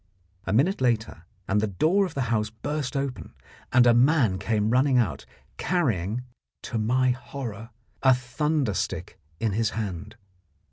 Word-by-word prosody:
A -, -, 0 dB
minute 140 Hz, -, +2 dB
later, 110 Hz, -8 st, 0 dB, 0.2 s
and 105 Hz, +1 st, +2 dB
the 110 Hz, -, +1 dB
door 165 Hz, -, +2 dB
of 170 Hz, -, -12 dB
the 135 Hz, -, 0 dB
house 105 Hz, -1 st, 0 dB
burst 140 Hz, +4 st, -4 dB
open, 135 Hz, -2 st, -4 dB, 0.4 s
and 125 Hz, -1 st, +6 dB
a 120 Hz, -, +6 dB
man 120 Hz, -6 st, +3 dB
came 110 Hz, -1 st, 0 dB
running 130 Hz, +1 st, +3 dB
out, 120 Hz, -5 st, 0 dB, 0.3 s
carrying, 120 Hz, -, 0 dB, 0.4 s
to 115 Hz, -, -3 dB
my 125 Hz, +4 st, +2 dB
horror, 120 Hz, -4 st, -6 dB, 0.3 s
a 130 Hz, -1 st, +6 dB
thunder 135 Hz, 0 st, -1 dB
stick -, -, -4 dB, 0.2 s
in 110 Hz, +1 st, 0 dB
his 110 Hz, +2 st, +1 dB
hand. 100 Hz, -1 st, -5 dB
120 Hz, 150 wpm, -26 LUFS, 110-135 Hz, 0.4 s, and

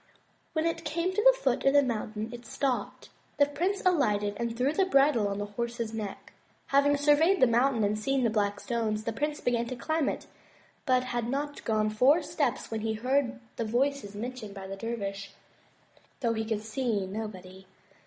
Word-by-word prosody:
When 315 Hz, -1 st, 0 dB
it 330 Hz, 0 st, -1 dB
came 335 Hz, +4 st, -1 dB
to 425 Hz, -, +1 dB
the -, -, +6 dB
foot 260 Hz, -1 st, +1 dB
of 275 Hz, -, +4 dB
the 285 Hz, -, +7 dB
mountain 220 Hz, -3 st, -3 dB
it 240 Hz, 0 st, -8 dB
stopped. 265 Hz, 0 st, -2 dB, 0.3 s
The 285 Hz, -, +6 dB
prince 350 Hz, +8 st, -1 dB
alighted 210 Hz, -, +2 dB
and 235 Hz, -1 st, -3 dB
threw 265 Hz, +4 st, +1 dB
the 380 Hz, +2 st, +2 dB
bridle 275 Hz, -, +4 dB
on 200 Hz, 0 st, -3 dB
his 205 Hz, 0 st, -4 dB
horse's 235 Hz, 0 st, -3 dB
neck. 210 Hz, -3 st, -6 dB, 0.4 s
Having 285 Hz, +1 st, +4 dB
surveyed 300 Hz, +6 st, +4 dB
the -, -, +7 dB
mountain 240 Hz, 0 st, +2 dB
and 210 Hz, +1 st, +1 dB
seen 270 Hz, +4 st, 0 dB
the 230 Hz, -, +2 dB
black 205 Hz, -2 st, 0 dB
stones, 220 Hz, -3 st, -2 dB
the 230 Hz, -, -2 dB
prince 295 Hz, +5 st, -2 dB
began 235 Hz, -1 st, 0 dB
to 255 Hz, -, -4 dB
climb 315 Hz, +4 st, 0 dB
it, -, -, -5 dB, 0.6 s
but 255 Hz, -1 st, +3 dB
had 240 Hz, -2 st, -2 dB
not 290 Hz, +2 st, -3 dB
gone 215 Hz, -1 st, +1 dB
four 275 Hz, +10 st, +4 dB
steps 270 Hz, -6 st, -1 dB
when 220 Hz, -1 st, -2 dB
he 220 Hz, 0 st, -1 dB
heard 255 Hz, +2 st, 0 dB, 0.2 s
the -, -, -1 dB
voices 240 Hz, -1 st, -1 dB
mentioned 225 Hz, -2 st, -6 dB
by 195 Hz, -1 st, -7 dB
the 195 Hz, 0 st, -6 dB
dervish, 200 Hz, -2 st, -5 dB, 0.9 s
though 235 Hz, -3 st, +1 dB
he 220 Hz, 0 st, -2 dB
could 220 Hz, -1 st, -2 dB
see 220 Hz, -3 st, -1 dB
nobody. 190 Hz, -2 st, -7 dB
240 Hz, 190 wpm, -29 LUFS, 215-280 Hz, 0.9 s, the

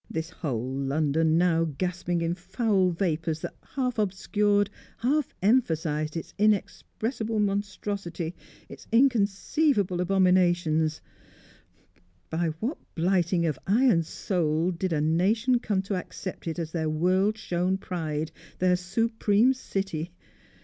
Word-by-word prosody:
This 160 Hz, +1 st, -4 dB
whole 130 Hz, -6 st, -3 dB
London 155 Hz, +3 st, +1 dB
now 170 Hz, -1 st, +3 dB
gasping 180 Hz, -1 st, -1 dB
in 165 Hz, +1 st, 0 dB
foul 190 Hz, +1 st, +1 dB
vapours 165 Hz, -3 st, -1 dB
that -, -, -5 dB
half 250 Hz, -4 st, -3 dB
obscured, 205 Hz, +1 st, +1 dB, 0.3 s
half 280 Hz, +4 st, 0 dB
emphasised 160 Hz, -, +1 dB
its 165 Hz, -, -7 dB
inexpressible 220 Hz, +2 st, 0 dB
monstrosity, 200 Hz, -4 st, -2 dB, 0.3 s
its -, -, -12 dB
inconceivable 220 Hz, -, +2 dB
abominations 175 Hz, -4 st, +2 dB, 1.3 s
by 165 Hz, +1 st, 0 dB
what 250 Hz, -, -2 dB, 0.2 s
blighting 175 Hz, 0 st, +2 dB
of 155 Hz, -5 st, -1 dB
eye 225 Hz, +7 st, +4 dB
and 175 Hz, -10 st, +4 dB
soul 165 Hz, 0 st, 0 dB
did 180 Hz, +1 st, -2 dB
a 155 Hz, -2 st, +1 dB
nation 210 Hz, -, +2 dB
come 205 Hz, -5 st, -1 dB
to 200 Hz, -, -3 dB
accept 185 Hz, -1 st, -5 dB
it 165 Hz, -, -3 dB
as 165 Hz, -2 st, -3 dB
their 160 Hz, -2 st, -1 dB
world 185 Hz, +7 st, +2 dB
shown 185 Hz, -2 st, 0 dB
pride, 160 Hz, -4 st, -3 dB, 0.3 s
their 180 Hz, 0 st, +3 dB
supreme 220 Hz, +5 st, +2 dB
City? 195 Hz, -9 st, -4 dB
180 Hz, 120 wpm, -27 LUFS, 165-205 Hz, 1.3 s, eye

